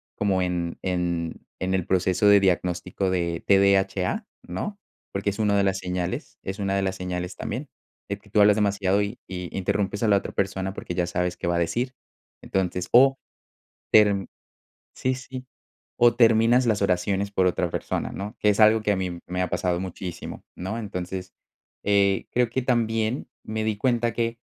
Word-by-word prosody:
como 95 -2 +1
en 90 -2 -2
en 85 -3 -2 0.2
en 95 +1 -1
el 95 -3 0
proceso 95 +2 +2
de 100 -1 +7
diagnóstico 90 0 0
de 85 -2 -1
TDHA, 100 - +3 0.2
¿no? 205 -1 -4 0.4
Porque 100 +1 0
es 100 - -5
una 105 -2 +2
de 100 - +3
las 95 -1 +1
señales. 90 -1 -4
Es 95 +2 -5
una 100 -1 0
de 100 - +1
las 95 0 -2
señales 90 -1 -4
también - - -4 0.4
de 100 - -2
que 105 - -22
tú 105 +1 +3
hablas 105 +1 +6
demasiado 100 -1 +2
y 105 +4 -3
y 90 -1 -6
interrumpes 100 +2 -1
a 110 - +3
la 100 - +6
otra - - -5
persona 95 -1 -1
porque 90 - -6
ya 85 -1 0
sabes 90 0 -1
qué - - -3
va 85 - +1
a 85 - +1
decir. 120 +10 -1 0.5
Entonces, 90 -1 -2
o 135 +2 +6 0.7
termi 100 -3 +5 0.7
sí, 130 0 0
sí. 130 0 -8 0.6
O 120 -1 +6
terminas 115 +1 +5
las 110 -3 +1
oraciones 95 +1 +1
por 95 -2 +1
otra 90 -1 +1
persona, - - -3
¿no? 100 +2 -6
Que 105 - +3
es 105 +1 +1
algo 110 0 +6
que 105 - +1
a - - +2
mí 90 -2 -3
me 90 +1 -2
ha 90 - -2
pasado 90 -1 0
muchísimo, 90 -1 -6
¿no? 95 +6 -4
Entonces, 95 -3 -5 0.5
eh, 100 -1 +3
creo 125 -1 +2
que 130 +3 -1
también 115 -1 0 0.2
me 110 0 -3
di 110 -2 -1
cuenta 120 -1 +1
que, 115 0 -1
100 Hz, 185 wpm, -25 LUFS, 90-110 Hz, 0.7 s, de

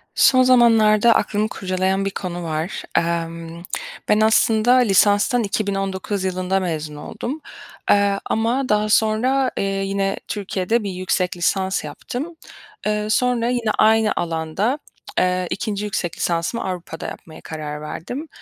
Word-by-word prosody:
Son 255 -1 +6
zamanlarda 230 -3 +5
aklımı 210 +1 +1
kurcalayan 190 0 -1
bir 195 - -1
konu 175 -2 -5
var. 160 +3 -3
Emm, 165 0 -2 0.5
ben 210 - +4
aslında 220 +1 +4
lisanstan 215 0 +4
2019 195 -1 -2
yılında 185 0 0
mezun 155 -4 -3
oldum. 260 - -6 0.5
Eee, 200 -1 +3
ama 240 +4 0
daha 210 0 +2
sonra, 245 +5 +2
eee, - - 0
yine 195 0 -1
Türkiye'de 205 +2 -1
bir 200 - -3
yüksek 180 0 -1
lisans 190 +2 0
yaptım. 285 +7 -6 0.5
Eee, 210 0 0
sonra 240 +1 +2
yine 240 -3 0
aynı 220 0 +4
alanda, 170 - -1 0.4
eee, 180 0 +1
2'nci 210 -1 -3
yüksek 175 -4 -3
lisansımı 170 +7 -1
Avrupa'da 180 -3 -5
yapmaya 160 -1 -10
karar 150 -1 -6
verdim. 245 - -6
200 Hz, 125 wpm, -21 LUFS, 180-225 Hz, 0.5 s, Son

